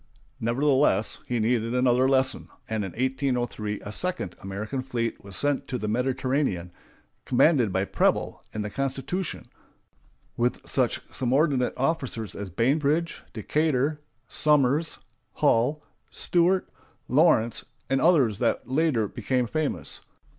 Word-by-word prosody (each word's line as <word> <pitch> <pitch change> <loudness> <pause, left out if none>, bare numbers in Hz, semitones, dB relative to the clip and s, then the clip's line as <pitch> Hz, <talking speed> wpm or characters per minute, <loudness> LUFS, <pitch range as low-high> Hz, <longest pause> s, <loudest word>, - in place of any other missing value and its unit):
Nevertheless, 130 -2 +2
he 120 -1 -1
needed 115 +1 +1
another 125 +1 +3
lesson, 130 -1 +2 0.2
and 110 -1 -2
in 95 - -4
1803 125 -5 -1
a 105 - -7
second 180 - -2
American 105 +7 -4
fleet 120 -4 -3
was 100 -1 -8
sent 145 +4 0
to 125 - -2
the 105 - -4
Mediterranean, 125 - 0 0.5
commanded 125 - +3
by 95 +1 0
Preble, - - 0
in 110 - -3
the 105 - -5
Constitution, 135 - -3 0.9
with 120 +1 -1
such - - +1
subordinate 130 0 +1
officers 130 -6 -2
as 100 -1 -5
Bainbridge, 145 - +1
Decatur, 150 +4 0 0.3
Somers, 150 +1 +2 0.4
Hull, 140 +7 +2 0.3
Stewart, 180 +2 +1 0.4
Lawrence, 125 -6 +3 0.2
and 135 0 +1
others 135 - +4
that 120 - 0
later 130 -5 +1
became 125 +3 -1
famous. 155 +5 -3
130 Hz, 120 wpm, -26 LUFS, 115-145 Hz, 0.9 s, others